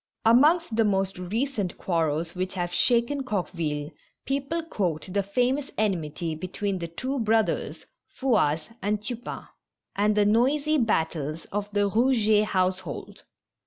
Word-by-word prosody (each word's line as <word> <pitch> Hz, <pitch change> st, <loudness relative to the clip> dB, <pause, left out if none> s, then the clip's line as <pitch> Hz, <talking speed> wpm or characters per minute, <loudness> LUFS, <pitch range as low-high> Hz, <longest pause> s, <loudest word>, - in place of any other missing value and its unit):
Amongst 290 Hz, +4 st, +5 dB
the 225 Hz, -, +4 dB
most 195 Hz, -3 st, 0 dB
recent 210 Hz, +1 st, -2 dB
quarrels 165 Hz, -1 st, -1 dB
which 185 Hz, +1 st, -3 dB
have 175 Hz, -1 st, -2 dB
shaken 240 Hz, +7 st, +2 dB
Coqueville, 170 Hz, -, -2 dB, 0.3 s
people 280 Hz, +5 st, -1 dB
quote 185 Hz, -, -2 dB
the 200 Hz, -, +2 dB
famous 250 Hz, +8 st, 0 dB
enmity 170 Hz, -6 st, -1 dB
between 185 Hz, +4 st, -3 dB
the 170 Hz, -, -4 dB
two 260 Hz, +11 st, -3 dB
brothers, 220 Hz, -1 st, 0 dB, 0.3 s
Fouasse 165 Hz, -, +1 dB
and 205 Hz, +2 st, 0 dB
Tupain, 235 Hz, +3 st, -6 dB, 0.5 s
and 210 Hz, +1 st, +2 dB
the 205 Hz, -, +4 dB
noisy 280 Hz, +8 st, +3 dB
battles 160 Hz, -, -1 dB
of 205 Hz, 0 st, -2 dB
the 205 Hz, 0 st, +2 dB
Eouget 220 Hz, -1 st, +3 dB
household. 185 Hz, -5 st, -2 dB
205 Hz, 125 wpm, -26 LUFS, 175-245 Hz, 0.5 s, Amongst